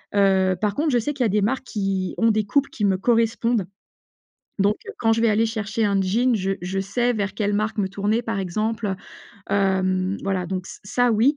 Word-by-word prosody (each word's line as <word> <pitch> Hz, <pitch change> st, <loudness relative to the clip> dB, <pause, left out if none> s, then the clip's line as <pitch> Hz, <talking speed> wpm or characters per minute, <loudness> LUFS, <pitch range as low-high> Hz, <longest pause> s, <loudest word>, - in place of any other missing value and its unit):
Heu, 190 Hz, -2 st, +3 dB
par 210 Hz, 0 st, 0 dB
contre 305 Hz, +1 st, +1 dB
je 245 Hz, -, +3 dB
sais 295 Hz, +6 st, -2 dB
qu'il 270 Hz, -, -1 dB
y -, -, +3 dB
a -, -, -1 dB
des 210 Hz, +1 st, +2 dB
marques 260 Hz, +5 st, -1 dB
qui 195 Hz, -4 st, -2 dB
ont 230 Hz, -1 st, +4 dB
des 215 Hz, -1 st, 0 dB
coupes 275 Hz, +6 st, +1 dB
qui 210 Hz, -, -2 dB
me 190 Hz, -1 st, +2 dB
correspondent. 230 Hz, -1 st, +1 dB, 0.9 s
Donc 205 Hz, +2 st, +2 dB
heu, -, -, -5 dB
quand 225 Hz, -1 st, +3 dB
je 225 Hz, -, -1 dB
vais 230 Hz, -, +4 dB
aller 220 Hz, +2 st, +3 dB
chercher 220 Hz, 0 st, -2 dB
un 200 Hz, -1 st, +2 dB
jean, 235 Hz, +7 st, +2 dB
je 195 Hz, -1 st, -1 dB
je 190 Hz, +2 st, -3 dB
sais 240 Hz, +5 st, 0 dB
vers 200 Hz, -3 st, -2 dB
quelle 205 Hz, -1 st, 0 dB
marque 215 Hz, +1 st, -1 dB
me 190 Hz, -2 st, +1 dB
tourner 205 Hz, +4 st, 0 dB
par 225 Hz, -3 st, -3 dB
exemple, 215 Hz, +3 st, -2 dB, 0.6 s
hem, 190 Hz, -1 st, +1 dB
voilà 190 Hz, -2 st, -1 dB
donc 185 Hz, 0 st, -4 dB
ç -, -, -10 dB
ça 245 Hz, +4 st, +2 dB
oui, 240 Hz, +7 st, +3 dB
210 Hz, 220 wpm, -23 LUFS, 195-230 Hz, 0.9 s, ont